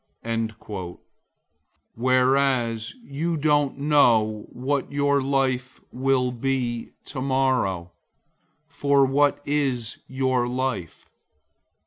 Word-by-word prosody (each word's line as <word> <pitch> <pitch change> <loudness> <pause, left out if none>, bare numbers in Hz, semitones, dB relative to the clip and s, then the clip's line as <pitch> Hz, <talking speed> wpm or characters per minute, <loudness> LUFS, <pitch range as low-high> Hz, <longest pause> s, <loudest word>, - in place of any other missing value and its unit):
004:014 110 -5 -4 1.0
Whereas 130 -2 +1
you 165 0 -2
don't 145 -2 +2
know 115 -8 +3
what 135 +3 -2
your 140 0 +2
life 130 -2 -1
will 130 0 +1
be 125 -1 -2
like - - -25
tomorrow. 130 - 0 0.7
For 140 -1 +2
what 140 +2 +2
is 135 -6 -1
your 130 -2 0
life? 125 -8 -3
130 Hz, 85 wpm, -24 LUFS, 120-140 Hz, 1.0 s, know